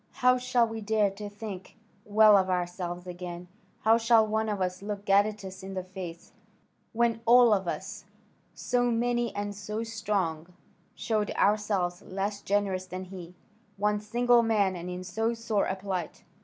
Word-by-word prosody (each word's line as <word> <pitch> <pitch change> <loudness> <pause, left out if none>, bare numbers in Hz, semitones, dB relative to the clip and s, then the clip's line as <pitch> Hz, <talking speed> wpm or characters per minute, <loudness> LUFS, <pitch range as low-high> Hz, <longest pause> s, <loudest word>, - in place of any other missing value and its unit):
How 250 0 +3
shall 250 -1 +2
we 225 0 -6
dare 210 -1 +2
to 205 +1 -7
think 205 -2 -8 0.3
well 215 0 +6
of 190 -1 +3
ourselves 175 0 -3
again? 175 0 -7 0.3
How 225 +1 +4
shall 230 -1 +5
one 220 0 -1
of 205 -2 -2
us 180 0 -2
look 205 0 -5
Gadatas 200 -1 +1
in 190 0 -7
the 185 - -3
face, 180 -2 -9 0.6
when 230 0 +1
all 240 -1 +7
of 190 -3 0
us, - - -5 0.5
so 245 0 0
many 240 0 0
and 205 0 -3
so 210 +2 -4
strong, 190 -7 -2 0.4
showed 215 -2 -1
ourselves 200 -4 +1
less 200 +2 -4
generous 195 -2 -1
than 185 +1 -6
he, 180 -2 -10 0.4
one 210 +1 +1
single 240 +3 +3
man 210 -5 +2
and 175 0 -6
in 180 0 -5
so 225 +5 -1
sore 225 -3 0
a 190 - -1
plight?" 190 -4 -5
205 Hz, 160 wpm, -28 LUFS, 185-220 Hz, 0.6 s, all